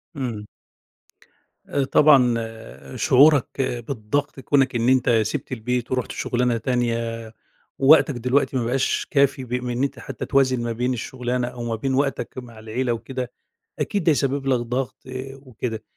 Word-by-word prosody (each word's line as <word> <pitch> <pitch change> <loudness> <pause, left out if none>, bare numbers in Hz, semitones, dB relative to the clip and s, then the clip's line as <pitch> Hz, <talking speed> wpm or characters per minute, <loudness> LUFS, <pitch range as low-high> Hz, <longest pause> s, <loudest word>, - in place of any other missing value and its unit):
امم. 120 -7 -4 1.2
آآ 140 - +1
طبعًا 135 -3 +5 0.6
شعورك 140 +3 +4 0.3
بالضغط 140 +3 -2
كونك 135 -1 +2
إن 120 +1 +2
أنت 130 -1 +3
سِبت 135 +5 -4
البيت، 125 0 -2
ورُحت 125 -1 -1
شغلانة 120 -1 0
تانية، 115 -2 -2 0.5
ووقتك 145 +1 +6
دلوقتي 125 +3 +1
مابقاش 125 +2 0
كافي 140 -2 +2
ب 125 -1 -7
من 125 0 -1
أنت 140 - -2
حتى 135 - -6
توازن 130 -3 +2
ما 120 - -2
بين 125 +3 -1
الشغلانة، 125 0 -3
أو 120 -1 -7
ما 115 -1 -2
بين 130 +4 -2
وقتك 135 0 -1
مع 120 -3 -9
العيلة 115 +3 -2
وكده، 125 +2 -5 0.5
أكيد 200 -3 -1
ده 160 - +4
يسبب 140 -1 0
لك 130 -2 +3
ضغط 125 +2 -3 0.4
وكده. 125 -4 -6
125 Hz, 145 wpm, -23 LUFS, 120-135 Hz, 1.2 s, ووقتك